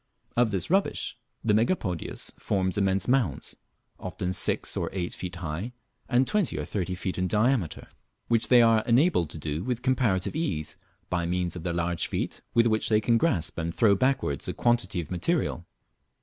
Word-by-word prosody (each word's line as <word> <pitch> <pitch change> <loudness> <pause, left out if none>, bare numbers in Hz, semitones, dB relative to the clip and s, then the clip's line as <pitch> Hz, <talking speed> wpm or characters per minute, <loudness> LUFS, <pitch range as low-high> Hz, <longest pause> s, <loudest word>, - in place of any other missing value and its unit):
Of 120 -1 +3
this 100 - -2
rubbish 195 +1 +1 0.3
the 110 - +2
Megapodius 110 - -1
forms 95 -2 0
immense 95 -1 +1
mounds, 125 - 0 0.4
often 90 +1 -3
six - - 0
or - - -1
eight 90 -2 -3
feet 90 0 -6
high 90 +7 -4 0.4
and 125 +1 +4
twenty 210 -4 0
or - - -3
thirty 90 -2 -2
feet 95 0 -4
in 90 - +1
diameter, 110 - +1 0.4
which 115 -1 +2
they 125 -2 +7
are 115 -1 +5
enabled 120 - +3
to 80 - -7
do 75 +2 -3
with 125 -1 -2
comparative 120 -6 +1
ease, 85 - -2 0.4
by 85 -1 0
means 90 0 -1
of 90 - -6
their 85 +1 -2
large 85 0 -1
feet, - - -3
with 115 0 +5
which 110 -2 +2
they 105 -1 +4
can 115 +2 +2
grasp 85 - 0
and 85 0 -3
throw 110 -4 +5
backwards 115 - 0
a - - -3
quantity 120 -6 +1
of 80 - -11
material. 90 - -1
100 Hz, 180 wpm, -27 LUFS, 85-120 Hz, 0.4 s, they